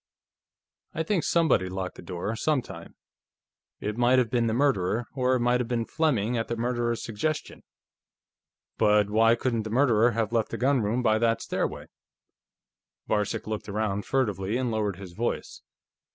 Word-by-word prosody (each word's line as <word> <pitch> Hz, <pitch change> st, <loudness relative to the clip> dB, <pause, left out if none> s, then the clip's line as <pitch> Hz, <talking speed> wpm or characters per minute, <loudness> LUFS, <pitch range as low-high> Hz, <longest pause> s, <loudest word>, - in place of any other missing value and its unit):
"I 160 Hz, -, 0 dB
think 180 Hz, 0 st, 0 dB
somebody 160 Hz, -, +2 dB
locked 95 Hz, 0 st, -4 dB
the -, -, -12 dB
door, 95 Hz, +4 st, -4 dB
sometime. 145 Hz, +2 st, -2 dB, 0.8 s
It 105 Hz, +1 st, -4 dB
might 125 Hz, +2 st, +4 dB
have 125 Hz, -3 st, +2 dB
been 120 Hz, -2 st, +2 dB
the -, -, +1 dB
murderer, 120 Hz, -5 st, +1 dB
or 130 Hz, -1 st, +1 dB
it 125 Hz, -, 0 dB
might 120 Hz, +1 st, +2 dB
have 120 Hz, -, -3 dB
been 120 Hz, -2 st, -1 dB
Fleming 125 Hz, -8 st, 0 dB
at 115 Hz, -, -2 dB
the 120 Hz, -, -2 dB
murderer's 120 Hz, 0 st, -1 dB
suggestion. 130 Hz, +8 st, -3 dB, 1.2 s
But 105 Hz, -1 st, +3 dB
why 115 Hz, +2 st, +5 dB
couldn't 120 Hz, -2 st, -1 dB
the 110 Hz, -, -6 dB
murderer 120 Hz, -1 st, +4 dB
have 115 Hz, 0 st, -1 dB
left 115 Hz, -2 st, +1 dB
the -, -, -4 dB
gunroom 125 Hz, -3 st, +1 dB
by 110 Hz, -2 st, +3 dB
that 115 Hz, 0 st, +2 dB
stairway?" -, -, -3 dB, 1.2 s
Varcek 105 Hz, -1 st, -1 dB
looked 110 Hz, -1 st, -5 dB
around 100 Hz, -1 st, -2 dB
furtively 105 Hz, -5 st, 0 dB
and 125 Hz, -2 st, -1 dB
lowered 105 Hz, -3 st, -1 dB
his 95 Hz, -2 st, -10 dB
voice. 120 Hz, +6 st, -3 dB
115 Hz, 160 wpm, -27 LUFS, 105-125 Hz, 1.2 s, why